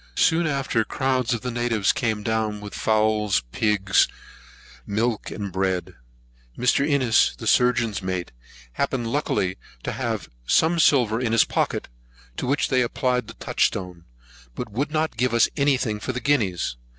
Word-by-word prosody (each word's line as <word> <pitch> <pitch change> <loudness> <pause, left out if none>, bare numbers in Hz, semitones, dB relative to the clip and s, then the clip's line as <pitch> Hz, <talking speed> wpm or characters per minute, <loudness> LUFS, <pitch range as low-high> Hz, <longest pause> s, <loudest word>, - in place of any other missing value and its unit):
Soon 165 0 +3
after, 135 -6 0
crowds 130 0 -1
of 120 -3 -1
the 125 - -3
natives 115 -4 +1
came 110 -3 -1
down 110 -2 -1
with 105 0 -9
fowls, 110 - +1
pigs, 100 - +2 0.8
milk, 110 - -1
and 100 -3 -5
bread. 95 -1 -1 0.6
Mr. 125 +3 +2
Innes, 140 -6 +3
the - - -8
surgeon's 120 -4 +2
mate, 95 -2 -3 0.4
happened 120 - -2
luckily 95 -10 0 0.3
to - - -2
have - - -3 0.2
some 165 +1 +3
silver 120 -7 +3
in 115 -3 0
his 115 - +5
pocket, - - -1 0.5
to - - -3
which 140 +3 +1
they 130 -2 +3
applied 125 +1 0
the - - -10
touchstone, 90 -3 -2 0.5
but 110 - -5
would 135 +8 -1
not 155 -4 -1
give 125 0 +1
us 115 - +5
any 140 -2 +3
thing 110 -4 -2
for 130 - -4
guineas. 100 - 0
115 Hz, 150 wpm, -24 LUFS, 105-130 Hz, 0.8 s, his